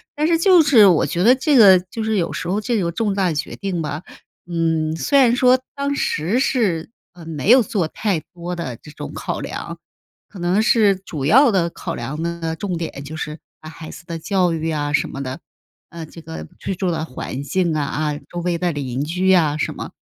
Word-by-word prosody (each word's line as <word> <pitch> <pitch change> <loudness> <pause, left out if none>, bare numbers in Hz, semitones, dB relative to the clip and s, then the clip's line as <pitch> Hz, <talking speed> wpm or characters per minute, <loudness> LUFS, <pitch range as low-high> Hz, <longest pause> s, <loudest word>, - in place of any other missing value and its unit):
但 300 0 0
是 330 -1 +2
就 360 -1 +6
是 240 -9 +7
我 175 -4 +4
觉 175 +2 -1
得 250 +4 +6
这 290 +2 +1
个 200 -6 +8
就 225 - -4
是 220 0 0
有 170 - -1
时 - - -4
候 195 +3 0
这 225 -1 -1
个 170 -1 -1
重 210 +2 -1
大 190 -3 +1
决 150 - -4
定 190 -4 -3
吧， 150 +1 -4 0.5
嗯， 160 -2 0
虽 280 - +2
然 245 -2 +5
说 255 0 +4
当 280 0 -1
时 185 - 0
是， 205 -12 0 0.2
呃， 175 -2 -13
没 160 - 0
有 255 0 +8
做 210 -9 -1
太 195 -1 -1
多 175 0 -5
的 130 -8 -5
这 150 - -15
种 150 - -8
考 - - -4
量， - - -6 0.5
可 195 - -12
能 180 +5 +1
是 220 -5 +4
主 160 -7 -6
要 250 - +6
的 180 -4 +1
考 - - -6
量 135 +6 -5
呢， 170 -1 -3
重 190 -1 -3
点 165 -4 -5
就 155 +3 -8
是 150 -1 -5 0.2
把 155 - -9
孩 160 0 -10
子 155 - -11
的 170 -1 -4
教 180 +1 +1
育 165 0 -2
啊 145 -1 -2
什 - - +2
么 135 - -6
的， 130 +1 -5 0.5
呃， 170 -1 -7
这 165 - -12
个 80 - -8
居 195 - -3
住 185 0 -1
的 165 -2 -2
环 130 0 -6
境 170 +3 0
啊， 150 0 -2
周 175 +3 -8
围 175 -1 0
的 175 0 0
邻 135 -3 -3
居 180 +4 +1
啊 155 -5 +3
什 - - -2
么 - - -7
175 Hz, 235 characters per minute, -20 LUFS, 155-210 Hz, 0.5 s, 个